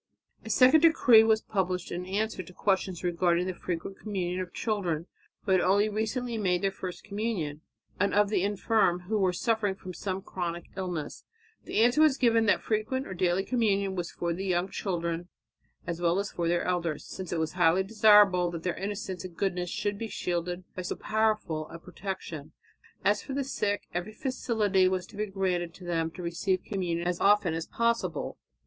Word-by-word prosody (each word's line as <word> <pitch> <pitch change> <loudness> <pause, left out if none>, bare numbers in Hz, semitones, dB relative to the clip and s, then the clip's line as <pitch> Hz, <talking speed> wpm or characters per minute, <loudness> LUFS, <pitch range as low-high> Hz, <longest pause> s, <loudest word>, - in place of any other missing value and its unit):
A - - -8
second 260 +5 +6
decree 275 -9 +7
was 220 0 +3
published 185 -3 -2
in 180 +1 -4
answer 210 +1 -1
to 180 0 -13
questions 190 -2 0
regarding 175 0 +2
the 185 - -2
frequent 180 +2 -5
communion 185 -4 -2
of 180 - -6
children 180 -8 -2 0.4
who 200 - -1
had 185 -1 +5
only 200 +3 +3
recently 225 +2 -2
made 180 -3 +1
their 195 - +2
first 185 -2 -7
communion, 200 -8 -3 0.4
and 200 +1 +2
of 205 0 +3
the 205 - +1
infirm 205 -2 +2
who 210 +4 -1
were 190 -2 +3
suffering 210 0 0
from 185 -1 -9
some 190 +1 -4
chronic 175 -2 -5
illness. 180 -6 -4 0.4
The - - +1
answer 245 +6 +4 0.2
given 230 -3 +4
was - - +2
that - - 0
frequent 225 +5 -1
or 190 - -6
daily 185 +1 +1
communion 200 -6 +1
was 175 -2 -3
for 170 -1 -3
young 180 +1 -1
children 170 -3 -3 0.6
as 170 0 -4
well 170 +1 +2
as 200 0 -2
for 170 -1 -2
their 175 0 +1
elders, 170 -4 -1
since 185 -2 -7
it 170 - -1
was 160 -1 -1
highly 180 +1 +3
desirable 205 -4 +5
that 170 -1 -6
their 180 - 0
innocence 195 -2 -4
and 180 -2 -9
goodness 180 -3 -1
should 205 +2 -2
be 225 - -3
shielded 175 -2 -3
by 185 - -3
so 180 - -3
powerful 215 -8 0
a - - -8
protection. 170 -4 -7 0.5
As 205 0 +3
for 270 - -7
the 280 +1 0
sick, 210 -6 -2
every 180 +5 -3
facility 215 -8 +1
was 185 -1 -1
to 215 - -16
be 210 +1 -2
granted 180 -3 -1
them 165 -2 0
to 180 +2 -9
receive 180 +2 -1
communion 175 -4 -2
as 180 -1 -1
often 200 -4 +4
as 165 0 -3
possible. 235 0 -1
190 Hz, 185 wpm, -29 LUFS, 175-210 Hz, 0.6 s, decree